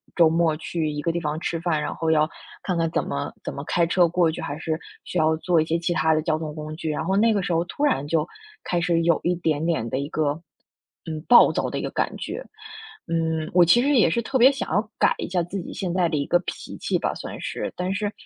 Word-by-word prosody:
周 165 Hz, -2 st, +6 dB
末 165 Hz, -1 st, +2 dB
去 155 Hz, 0 st, -3 dB
一 150 Hz, 0 st, -4 dB
个 165 Hz, -, 0 dB
地 170 Hz, -, -2 dB
方 150 Hz, -2 st, -2 dB
吃 165 Hz, -, -2 dB
饭， 160 Hz, -3 st, 0 dB
然 150 Hz, -, -3 dB
后 160 Hz, -, -2 dB
要 155 Hz, -1 st, +3 dB, 0.3 s
看 180 Hz, -3 st, -1 dB
看 165 Hz, -1 st, +1 dB
怎 -, -, 0 dB
么 70 Hz, 0 st, -4 dB
怎 -, -, -4 dB
么 140 Hz, -, -6 dB
开 170 Hz, +1 st, +2 dB
车 175 Hz, +1 st, +3 dB
过 170 Hz, -1 st, +2 dB
去， -, -, -7 dB
还 145 Hz, -, -4 dB
是 160 Hz, 0 st, -3 dB, 0.2 s
需 180 Hz, -, -5 dB
要 160 Hz, 0 st, +3 dB
坐 170 Hz, +1 st, +2 dB
一 -, -, -1 dB
些 165 Hz, +1 st, 0 dB
其 170 Hz, +1 st, -2 dB
他 160 Hz, -1 st, +2 dB
的 155 Hz, -, +1 dB
交 155 Hz, -1 st, 0 dB
通 155 Hz, -2 st, -5 dB
工 155 Hz, 0 st, -6 dB
具 160 Hz, -2 st, -3 dB
呀， 150 Hz, -, -3 dB
然 160 Hz, -, -2 dB
后 190 Hz, +3 st, +1 dB
那 225 Hz, +1 st, +4 dB
个 200 Hz, -2 st, 0 dB
时 180 Hz, -, -2 dB
候 165 Hz, +1 st, +1 dB
突 280 Hz, -, -5 dB
然 255 Hz, -, +1 dB
就 155 Hz, 0 st, +1 dB, 0.4 s
开 175 Hz, -, -1 dB
始 170 Hz, -1 st, +1 dB
有 170 Hz, -1 st, +3 dB
一 175 Hz, +1 st, +1 dB
点 160 Hz, -2 st, -1 dB
点 155 Hz, -9 st, 0 dB
的 130 Hz, -, -1 dB
一 140 Hz, -, -3 dB
个 155 Hz, 0 st, -1 dB, 0.6 s
嗯， 160 Hz, -2 st, -4 dB
暴 245 Hz, -, +8 dB
躁 -, -, -1 dB
的 -, -, -3 dB
一 -, -, -3 dB
个 -, -, -3 dB
感 -, -, -1 dB
觉。 -, -, -5 dB, 0.7 s
嗯， 160 Hz, -1 st, -1 dB
我 180 Hz, -1 st, +7 dB
其 235 Hz, +9 st, +5 dB
实 285 Hz, +1 st, +2 dB
也 220 Hz, -, +5 dB
是 235 Hz, -, 0 dB
特 260 Hz, +3 st, -1 dB
别 255 Hz, +2 st, +7 dB
想 275 Hz, -, -4 dB
要 210 Hz, +2 st, 0 dB
改 -, -, +4 dB
一 -, -, -4 dB
下 180 Hz, 0 st, 0 dB
自 175 Hz, +4 st, -4 dB
己 -, -, -8 dB
现 185 Hz, -3 st, -3 dB
在 180 Hz, 0 st, +2 dB
的 160 Hz, -, -2 dB
一 140 Hz, -1 st, -1 dB
个 175 Hz, -, +4 dB
脾 -, -, -7 dB
气 -, -, -1 dB
吧， -, -, 0 dB
算 -, -, -7 dB
是， -, -, -4 dB
但 180 Hz, +1 st, -2 dB
是， 205 Hz, +1 st, -2 dB
165 Hz, 295 characters per minute, -24 LUFS, 155-180 Hz, 0.7 s, 暴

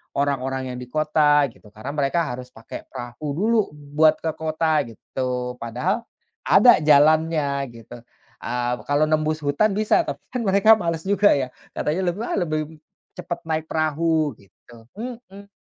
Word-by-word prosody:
orang-orang 135 Hz, -2 st, -1 dB
yang 125 Hz, -, -6 dB
di 125 Hz, -, -8 dB
kota 150 Hz, +1 st, +3 dB
gitu, 110 Hz, -, -20 dB
karena 125 Hz, +6 st, -6 dB
mereka 145 Hz, +3 st, 0 dB
harus 125 Hz, +1 st, -7 dB
pake 115 Hz, -3 st, -10 dB
perahu 120 Hz, +5 st, -7 dB
dulu 220 Hz, +6 st, +2 dB, 0.2 s
buat 150 Hz, +2 st, +2 dB
ke 160 Hz, -, 0 dB
kota 160 Hz, -2 st, 0 dB
gitu, 125 Hz, +1 st, -4 dB
padahal 155 Hz, -, -2 dB, 0.4 s
ada 245 Hz, -, +7 dB
jalannya 155 Hz, +1 st, +4 dB, 0.3 s
gitu. 115 Hz, +1 st, -11 dB, 0.4 s
Eee, 120 Hz, 0 st, -2 dB
kalau 145 Hz, +1 st, +2 dB
nembus 155 Hz, 0 st, 0 dB
hutan 170 Hz, +9 st, +1 dB
bisa 215 Hz, -, +2 dB
tapi -, -, -5 dB
kan 250 Hz, -, -2 dB
mereka 200 Hz, +3 st, +5 dB
males 165 Hz, -3 st, -2 dB
juga 200 Hz, +1 st, +4 dB
ya, 130 Hz, -3 st, -2 dB, 0.2 s
katanya 180 Hz, +5 st, -1 dB
lebih, 175 Hz, +5 st, -2 dB
"Ah, 235 Hz, -, -2 dB
lebih 155 Hz, -2 st, -3 dB, 0.4 s
cepat 175 Hz, -1 st, -5 dB
naik 160 Hz, 0 st, -1 dB
perahu 155 Hz, -3 st, 0 dB
gitu. 115 Hz, +3 st, -19 dB
Mhm. 215 Hz, -4 st, -9 dB
155 Hz, 150 wpm, -23 LUFS, 130-170 Hz, 0.4 s, ada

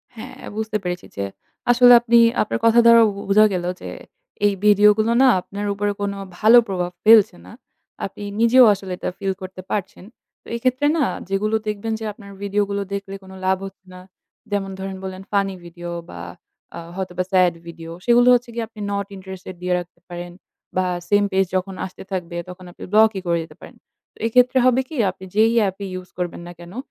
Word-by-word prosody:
হ্যাঁ, 225 Hz, -, -9 dB, 0.2 s
বুঝতে 220 Hz, -1 st, -2 dB
পেরেছি 180 Hz, 0 st, -4 dB
যে, 100 Hz, -, -1 dB, 0.5 s
আসলে 245 Hz, 0 st, +7 dB
আপনি 235 Hz, 0 st, +3 dB, 0.2 s
আপনার 215 Hz, -, -2 dB
কথা 230 Hz, +1 st, +6 dB
দ্বারা 230 Hz, 0 st, +8 dB
বু -, -, -8 dB
বুঝা 215 Hz, +2 st, +6 dB
গেলো 175 Hz, -1 st, -2 dB
যে, -, -, -7 dB, 0.6 s
এই 205 Hz, -, +3 dB
video 210 Hz, 0 st, +6 dB
গুলো 220 Hz, +2 st, +1 dB
না 265 Hz, -, +6 dB
আপনার 200 Hz, +3 st, -6 dB
উপরে 205 Hz, +1 st, -1 dB
কোন 200 Hz, 0 st, -1 dB, 0.3 s
ভালো 225 Hz, +3 st, +7 dB
প্রভাব 180 Hz, -2 st, -2 dB
ফেলছে 220 Hz, -2 st, +6 dB
না। 90 Hz, -, -13 dB, 0.5 s
আপনি 205 Hz, -, -8 dB, 0.2 s
নিজেও 240 Hz, +2 st, +6 dB
আসলে 195 Hz, -1 st, -7 dB
এটা -, -, -3 dB
feel 195 Hz, -1 st, -1 dB
করতে 185 Hz, 0 st, -8 dB
পারছেন। 195 Hz, -2 st, -4 dB, 0.4 s
তো -, -, -19 dB
এক্ষেত্রে 255 Hz, +4 st, +1 dB
না 305 Hz, -, +2 dB, 0.3 s
যেগুলো 210 Hz, +3 st, 0 dB
দেখবেন 210 Hz, +2 st, -3 dB
যে 220 Hz, -, -6 dB
আপনার 200 Hz, -1 st, -14 dB
video 205 Hz, +1 st, 0 dB
গুলো 200 Hz, 0 st, -2 dB
দেখলেকোন 195 Hz, -1 st, -7 dB
লাভ 190 Hz, 0 st, +2 dB
হচ্ছে 190 Hz, -1 st, -12 dB
না 180 Hz, -, -11 dB, 0.5 s
যেমন 195 Hz, -1 st, -2 dB
ধরেন, 195 Hz, 0 st, -5 dB
বললেন 190 Hz, 0 st, -7 dB
funny 195 Hz, -1 st, 0 dB
video 175 Hz, 0 st, -9 dB, 0.2 s
বা 85 Hz, -, -9 dB, 0.6 s
আ -, -, -5 dB, 0.2 s
হয়তোবা 185 Hz, -1 st, -3 dB
sad 185 Hz, -2 st, +4 dB
video, 165 Hz, -1 st, -9 dB, 0.2 s
সেগুলো 240 Hz, 0 st, +5 dB
হচ্ছে 245 Hz, 0 st, -2 dB
গিয়ে 230 Hz, 0 st, -3 dB
আপনি 220 Hz, -1 st, -16 dB
not 200 Hz, 0 st, -2 dB
interested 190 Hz, -1 st, -9 dB
দিয়ে 180 Hz, 0 st, -1 dB
রাখতে 175 Hz, -1 st, -11 dB
পারেন 175 Hz, 0 st, -7 dB, 0.5 s
বা 185 Hz, -, +2 dB, 0.2 s
same 205 Hz, 0 st, +3 dB
page 190 Hz, -1 st, +1 dB
যখন 190 Hz, +1 st, -4 dB
আসতে 185 Hz, -, -10 dB
থাকবে 175 Hz, -2 st, -4 dB
তখন 180 Hz, 0 st, -11 dB
আপনি -, -, -12 dB
block 220 Hz, +1 st, +6 dB
ই -, -, -4 dB
করে 170 Hz, 0 st, +2 dB
দিতে 155 Hz, -1 st, -15 dB
পারেন। -, -, -12 dB, 0.4 s
তো, -, -, -25 dB
এক্ষেত্রে 250 Hz, +3 st, +3 dB
হবে 255 Hz, 0 st, +4 dB
কি? 315 Hz, -, -8 dB, 0.2 s
আপনি 190 Hz, -, -13 dB
যেই 220 Hz, +1 st, +4 dB, 0.2 s
app 190 Hz, 0 st, -5 dB
ই -, -, -5 dB
use 180 Hz, -, -16 dB
করবেন 175 Hz, -1 st, -4 dB
না -, -, -8 dB
কেনো 175 Hz, +5 st, -11 dB
195 Hz, 195 wpm, -21 LUFS, 185-220 Hz, 0.6 s, দ্বারা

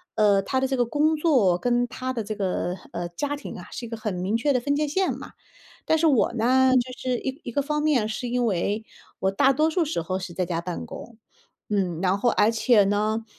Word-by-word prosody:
呃 205 Hz, -2 st, +4 dB
他 260 Hz, +7 st, -1 dB
的 265 Hz, -, +1 dB
这 265 Hz, -, -1 dB
个 245 Hz, -, +2 dB
工 300 Hz, +6 st, +2 dB
作， 255 Hz, -, +3 dB
跟 245 Hz, +2 st, +1 dB
他 255 Hz, +2 st, -4 dB
的 235 Hz, -3 st, -3 dB
这 215 Hz, +1 st, -4 dB
个， 185 Hz, -3 st, -1 dB, 0.2 s
呃， 175 Hz, 0 st, -4 dB
家 290 Hz, +12 st, -3 dB
庭 290 Hz, -, -8 dB
啊 -, -, -11 dB
是 245 Hz, -, -6 dB
一 -, -, -9 dB
个 230 Hz, -, -4 dB
很 210 Hz, -3 st, -3 dB
明 185 Hz, +4 st, -1 dB
确 245 Hz, +6 st, +1 dB
的 250 Hz, -, +2 dB
分 285 Hz, +4 st, 0 dB
界 300 Hz, +1 st, 0 dB
线 375 Hz, +6 st, 0 dB
嘛。 -, -, -10 dB, 0.5 s
但 320 Hz, -, +3 dB
是 320 Hz, +1 st, +2 dB
我 265 Hz, -6 st, +3 dB
呢 255 Hz, +3 st, +3 dB
就 255 Hz, 0 st, +1 dB
是 250 Hz, -1 st, -1 dB
一 265 Hz, +4 st, -5 dB
一 -, -, -4 dB
个 285 Hz, -, +1 dB
方 300 Hz, +1 st, -1 dB
面 285 Hz, -8 st, +2 dB
是 230 Hz, +3 st, -4 dB
因 245 Hz, 0 st, 0 dB
为， 205 Hz, +1 st, -1 dB, 0.4 s
我 190 Hz, -, +2 dB
大 265 Hz, +8 st, +3 dB
多 310 Hz, +4 st, +2 dB
数 335 Hz, +1 st, +1 dB
时 295 Hz, -, -2 dB
候 185 Hz, +3 st, -2 dB
是 185 Hz, -2 st, -7 dB
在 185 Hz, -, 0 dB
家 170 Hz, -1 st, -2 dB
办 175 Hz, 0 st, -5 dB
公。 235 Hz, -, -10 dB, 0.5 s
嗯， 185 Hz, -5 st, 0 dB
然 190 Hz, 0 st, +2 dB
后 240 Hz, +4 st, +2 dB
而 210 Hz, -, +3 dB
且 225 Hz, -2 st, +4 dB
呢， 215 Hz, +3 st, 0 dB
235 Hz, 260 characters per minute, -25 LUFS, 200-270 Hz, 0.5 s, 呃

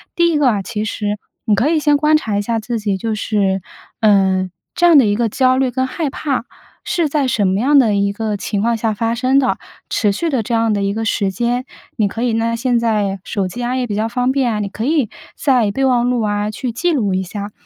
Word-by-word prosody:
第 340 Hz, 0 st, +3 dB
一 310 Hz, -, +1 dB
个 290 Hz, -2 st, +3 dB
啊， 205 Hz, -3 st, -1 dB
其 210 Hz, +1 st, -4 dB
实， 210 Hz, -1 st, -2 dB, 0.3 s
你 210 Hz, -, +3 dB
可 230 Hz, +8 st, +1 dB
以 325 Hz, -1 st, +2 dB
先 295 Hz, -1 st, +3 dB
观 305 Hz, +1 st, +3 dB
察 220 Hz, -9 st, 0 dB
一 205 Hz, -, 0 dB
下 230 Hz, +2 st, -1 dB
自 235 Hz, +2 st, -3 dB
己。 205 Hz, -2 st, -1 dB
就 220 Hz, +3 st, -2 dB
是， 200 Hz, -3 st, 0 dB, 0.4 s
呃， 190 Hz, -3 st, +3 dB, 0.3 s
这 350 Hz, -, +2 dB
样 340 Hz, -3 st, +7 dB
的 265 Hz, -, +6 dB
一 205 Hz, -1 st, +1 dB
个 235 Hz, +1 st, +1 dB
焦 255 Hz, +3 st, +2 dB
虑 265 Hz, -1 st, +2 dB
跟 260 Hz, +1 st, 0 dB
害 310 Hz, +2 st, -2 dB
怕， 270 Hz, -3 st, -2 dB, 0.4 s
是 340 Hz, -3 st, 0 dB
在 280 Hz, -2 st, +1 dB
什 210 Hz, -5 st, +1 dB
么 190 Hz, +1 st, +1 dB
样 285 Hz, +5 st, +4 dB
的 220 Hz, -6 st, +3 dB
一 200 Hz, 0 st, +1 dB
个 215 Hz, 0 st, -2 dB
情 200 Hz, 0 st, -2 dB
况 235 Hz, +2 st, +1 dB
下 225 Hz, 0 st, 0 dB
发 225 Hz, +2 st, -1 dB
生 255 Hz, +3 st, +2 dB
的， 265 Hz, -, +1 dB, 0.3 s
持 210 Hz, -, +1 dB
续 330 Hz, +12 st, -2 dB
的 265 Hz, -6 st, 0 dB
这 235 Hz, -, -4 dB
样 225 Hz, -1 st, +2 dB
的 200 Hz, -1 st, -1 dB
一 200 Hz, 0 st, 0 dB
个 225 Hz, +1 st, -3 dB
时 200 Hz, -3 st, 0 dB
间。 240 Hz, +5 st, -1 dB, 0.3 s
你 215 Hz, -3 st, +2 dB
可 225 Hz, +3 st, -5 dB
以 240 Hz, -2 st, +1 dB
呢， 230 Hz, +1 st, 0 dB
现 240 Hz, +1 st, +1 dB
在 210 Hz, -4 st, 0 dB
手 200 Hz, -3 st, -2 dB
机 240 Hz, +7 st, -6 dB
啊， 245 Hz, +1 st, -1 dB
也 255 Hz, -1 st, 0 dB
比 205 Hz, -, -3 dB
较 215 Hz, +2 st, 0 dB
方 250 Hz, +2 st, 0 dB
便 265 Hz, -3 st, +1 dB
啊， 210 Hz, -, -2 dB
你 205 Hz, -, -2 dB
可 215 Hz, -, -5 dB
以 290 Hz, -6 st, +1 dB, 0.3 s
在 250 Hz, -7 st, +2 dB
备 270 Hz, +6 st, 0 dB
忘 245 Hz, -2 st, +2 dB
录 245 Hz, -2 st, 0 dB
啊， 205 Hz, -1 st, -1 dB
去 245 Hz, +3 st, -4 dB
记 335 Hz, +10 st, 0 dB
录 210 Hz, -9 st, 0 dB
一 190 Hz, 0 st, 0 dB
下。 200 Hz, +2 st, -6 dB
230 Hz, 275 characters per minute, -18 LUFS, 205-260 Hz, 0.4 s, 样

